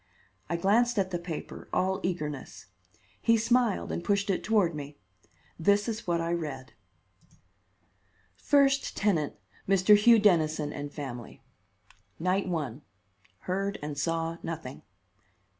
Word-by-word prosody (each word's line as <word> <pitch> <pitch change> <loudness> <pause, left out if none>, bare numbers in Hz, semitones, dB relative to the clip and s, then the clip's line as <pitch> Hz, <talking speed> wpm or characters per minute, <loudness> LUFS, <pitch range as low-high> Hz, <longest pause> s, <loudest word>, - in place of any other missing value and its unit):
I - - 0
glanced 230 +7 +2
at 190 -2 +1
the 175 - -2
paper, 170 -3 -7
all 190 +1 +1
eagerness. 150 - -4 0.6
He 230 0 +4
smiled 235 -1 +1
and 170 - -3
pushed 200 +1 +1
it 185 - -2
toward 205 -6 +2
me. 145 -1 -7 0.6
This 200 +6 +3
is 225 -3 -4
what 170 -1 +1
I 165 0 -1
read: 140 -6 -5 1.6
First 280 -1 +2
tenant, 170 -8 +1 0.3
Mr. 195 +2 +6
Hugh 230 +3 +6
Dennison 155 -7 +2
and 145 0 -6
family. 130 -6 -8 0.7
Night 185 +4 0
1: 150 -7 -3 0.6
Heard 195 +2 -2
and 150 -1 -4
saw 165 +3 -1
nothing. 160 -5 -6
175 Hz, 125 wpm, -29 LUFS, 150-205 Hz, 1.6 s, Mr